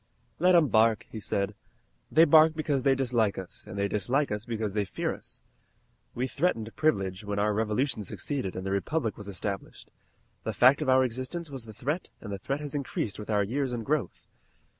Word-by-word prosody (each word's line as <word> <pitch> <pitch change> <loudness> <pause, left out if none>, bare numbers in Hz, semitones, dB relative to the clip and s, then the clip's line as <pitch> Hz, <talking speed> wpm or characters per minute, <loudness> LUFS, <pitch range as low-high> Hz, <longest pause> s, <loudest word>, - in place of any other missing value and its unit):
"Let 180 +2 +5
'em 160 -5 +5
bark," 110 0 +3
he 110 - -5
said. 100 0 -1 0.6
"They 160 +3 +7
bark 160 +1 +6
because 150 -4 0
they 135 0 +3
dislike 120 -6 +1
us, 95 -2 -6
and 100 - -7
they 100 0 +1
dislike 120 +8 0
us 105 +1 -3
because 110 -4 -3
they 105 -1 +1
fear 100 - -2
us. - - -11 0.7
We 125 - 0
threatened 130 -6 -1
Privilege 100 -10 0
when 100 0 -3
our 105 +1 +2
Revolution 110 +4 0
succeeded 105 +1 -4
and 95 - -5
the 95 - -2
Republic 115 +4 -1
was 105 - -10
established. 100 0 -5 0.5
The 110 - -3
fact 130 +7 +6
of 145 - 0
our 130 0 +6
existence 130 +7 -3
was 130 -4 -6
the 110 - -9
threat 150 - -3
and 105 -3 -7
the 100 - -4
threat 140 +8 -3
has 145 -2 -5
increased 130 -7 -3
with 105 - -8
our 105 -1 +3
years 130 +5 -1
and 115 -2 -4
growth. 140 - -1
115 Hz, 200 wpm, -28 LUFS, 105-140 Hz, 0.7 s, They